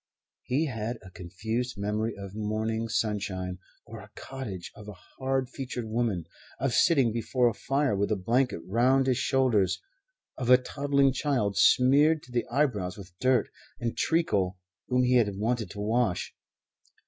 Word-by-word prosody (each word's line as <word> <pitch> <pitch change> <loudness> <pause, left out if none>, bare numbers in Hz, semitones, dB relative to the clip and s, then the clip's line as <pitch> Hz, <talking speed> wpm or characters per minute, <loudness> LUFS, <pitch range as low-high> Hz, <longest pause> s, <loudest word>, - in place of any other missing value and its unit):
He 140 +6 0
had 115 -3 -3
a 90 - -12
confused 110 +8 -4
memory 105 +2 -2
of 100 -1 -8
morning 110 +1 -2
sunshine, 95 -4 -2 0.3
of 115 0 -9
a 105 - -15
cottage, 110 -10 -7
of 105 0 -12
a 105 - -7
hard 130 +7 -3
featured 130 -2 -5
woman, 110 -6 -1 0.3
of 135 -2 0
sitting 135 -8 +4
before 120 +2 +1
a 115 - +1
fire 135 0 0
with 100 +1 0
a - - +3
blanket 120 +1 0
round 130 +6 +3
his 130 -1 +1
shoulders, 115 -9 +2 0.6
of 125 -2 -2
a 125 - +9
toddling 140 +1 +1
child 125 -8 0
smeared 145 +5 +5
to 125 - -15
the 120 -1 -1
eyebrows 110 -10 0
with 90 -3 -11
dirt 130 -1 +2 0.3
and 120 -1 -2
treacle 100 - +1 0.3
whom 125 0 +2
he 125 0 +4
had 105 -5 +2
wanted 115 +1 -1
to 105 - -9
wash. 110 -3 0
115 Hz, 160 wpm, -28 LUFS, 105-130 Hz, 0.6 s, a